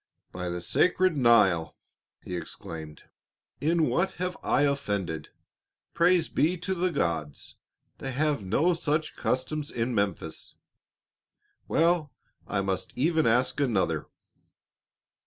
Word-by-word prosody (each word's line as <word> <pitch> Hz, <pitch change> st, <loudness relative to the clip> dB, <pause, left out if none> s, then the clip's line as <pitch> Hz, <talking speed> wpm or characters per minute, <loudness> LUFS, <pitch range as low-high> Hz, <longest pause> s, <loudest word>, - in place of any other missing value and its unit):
"By 90 Hz, 0 st, -4 dB
the 85 Hz, 0 st, -4 dB
sacred 185 Hz, -, +3 dB
Nile!" 105 Hz, -, +4 dB, 0.5 s
he 90 Hz, -, -5 dB
exclaimed, 80 Hz, -3 st, -8 dB, 0.6 s
"in 160 Hz, +2 st, +2 dB
what 190 Hz, +2 st, +1 dB
have 180 Hz, 0 st, -3 dB
I 140 Hz, -, +2 dB
offended? 100 Hz, -, -1 dB, 0.6 s
Praise 170 Hz, -1 st, +3 dB
be 170 Hz, +4 st, +1 dB
to 190 Hz, +3 st, -2 dB
the 180 Hz, 0 st, 0 dB
gods, 80 Hz, -, -2 dB, 0.4 s
they 135 Hz, -, -4 dB
have 145 Hz, -3 st, 0 dB
no 145 Hz, -, +2 dB
such 155 Hz, -1 st, -1 dB
customs 145 Hz, +4 st, -2 dB
in 120 Hz, +1 st, -2 dB
Memphis. 100 Hz, -4 st, -2 dB, 1.1 s
Well, 165 Hz, -3 st, +2 dB, 0.4 s
I 100 Hz, -, 0 dB
must 95 Hz, -1 st, -3 dB
even 160 Hz, +3 st, +2 dB
ask 125 Hz, +5 st, +2 dB
another." 95 Hz, -, 0 dB
130 Hz, 115 wpm, -28 LUFS, -, 1.1 s, Nile